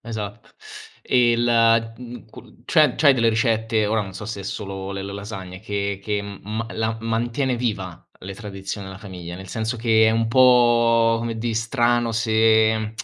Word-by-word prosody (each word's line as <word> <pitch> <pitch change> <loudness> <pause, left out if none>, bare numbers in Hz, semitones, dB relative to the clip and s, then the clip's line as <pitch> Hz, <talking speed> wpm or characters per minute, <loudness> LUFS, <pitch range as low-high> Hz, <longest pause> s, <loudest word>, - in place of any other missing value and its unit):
Esatto. 110 -2 -7 0.5
E 120 -2 +3
la 115 -1 +3
mhmm, 125 -1 -10
cu 115 - -16
c'è 150 -5 +3
c'hai 145 -3 +5
delle 115 -3 +2
ricette? 110 -1 +1
Ora 110 +1 +1
non 95 -2 -6
so 105 - -7
se 100 -2 -6
è - - -7
solo 95 -1 -6
le 95 0 -5
le 100 0 -6
lasagne 95 -2 -8
che 100 -2 -3
che 105 -1 -2
m 100 -1 -9
ma 110 +2 -4
la 110 0 -2
mantiene 120 +3 -1
viva 100 -7 -4 0.2
le 95 +1 -7
tradizioni 100 -2 -7
della 95 0 -9
famiglia, 90 -4 -9
nel 95 0 -10
senso 110 +4 -3
che 110 -1 +3
è - - +4
un 115 0 0
po', 120 -2 +4
come 115 -1 -4
dì, 115 0 -2
strano 120 0 +1
se 110 -1 +2
110 Hz, 180 wpm, -22 LUFS, 100-115 Hz, 0.5 s, c'hai